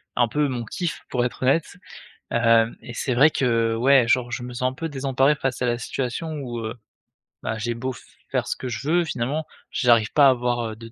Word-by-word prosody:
un 120 -1 +3
peu 150 +5 0
mon 120 -3 -3
kiff 170 - -4
pour 125 - 0
être 125 +1 -5
honnête, 140 +5 +1 0.6
heu, 115 -1 +4
et 120 - -9
c'est 125 +2 -1
vrai 145 +6 +6
que 115 -5 +1
ouais, 130 0 +4
genre, 120 0 +2
je 120 - -3
me 125 0 -7
sens 125 +1 0
un - - -12
peu 165 +4 -4
désemparé 135 0 +2
face 135 -2 -2
à - - +2
la 120 -1 +1
situation 135 +6 -3
où, 120 -3 -5
heu, 110 0 -4 0.7
bah, 110 - -2
j'ai 120 +2 -1
beau 130 +2 -3 0.4
faire - - 0
ce - - -1
que 130 - -5
je 120 +4 -5
veux, 175 +1 +3
finalement, 145 +2 -2 0.3
j'arrive 120 -3 +3
pas 145 -2 +7
à - - +8
avoir 120 -3 -1
de 115 0 -11
125 Hz, 220 wpm, -23 LUFS, 115-135 Hz, 0.7 s, à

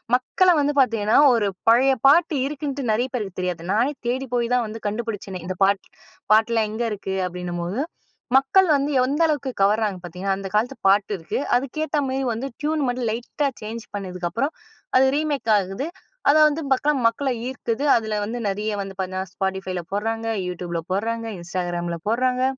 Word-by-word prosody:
மக்கள 365 +8 +2
வந்து 290 +1 +1
பார்த்தீங்கன்னா, 220 -3 +2 0.2
ஒரு 205 -3 +1 0.2
பழைய 260 +4 +5
பாட்டு 310 +1 +5
இருக்குன்ட்டு 280 -1 -4
நிறைய 245 +4 +1
பேருக்கு 200 -6 -4
தெரியாது. 180 -2 -3
நானே 245 +7 +2
தேடி 260 +2 -1
போய் 240 0 0
தா 250 - +4
ன் - - -2
வந்து 220 +1 -8
கண்டுபிடிச்சேனே! 205 -4 -4
இந்த 185 0 -4
பாட்டு 195 0 +2 0.5
பாட்டெலாம் 220 0 +3
எங்கே 230 +2 -2
இருக்கு? 190 -1 -4
அப்பிடின்னும்போது, 180 +5 -4 0.6
மக்கள் 360 +8 +4
வந்து 280 +2 -1
எந்த 285 +5 0
அளவுக்கு 285 -3 -1
கவறாங்க 210 -1 +2
பார்த்தீங்கன்னா, 185 +3 -2
அந்த 195 - -5
காலத்து 245 +5 +1
பாட்டு 200 +1 +3
இருக்கு. 165 +7 -3 0.2
அதுக்கேத்தமாரி 275 0 -2
வந்து 240 +5 -4
ட்யூன் 305 0 0
மட்டும் 245 -2 -1
லைட்டா 245 +5 -2 0.2
சேஞ்ச் 225 +2 -6
பண்ணதுக்கு 180 -3 -4
அப்புறம், 275 - -1 0.4
அது 265 +1 +5
ரீமேக் 295 -6 0
ஆகுது 195 - -4 0.4
அத 285 - +6
வந்து 305 +2 -1
பக்கா 285 +3 +3
மக்கள 250 +4 +2 0.2
ஈர்க்குது. 255 0 -3
அதில 220 -2 -1
வந்து 225 +4 -4
நிறைய 210 +2 -1
வந்து 195 0 -6
பார்த்தன்னா, 185 0 -2
Spodtifyல 190 -2 -3
போட்றாங்க, 225 +3 -2 0.2
YouTubeல 175 -1 -4
போட்றாங்க. 230 +4 -1
Instagramல 175 -1 -3
போட்றாங்க. 255 +3 +1
225 Hz, 160 wpm, -23 LUFS, 195-265 Hz, 0.6 s, அத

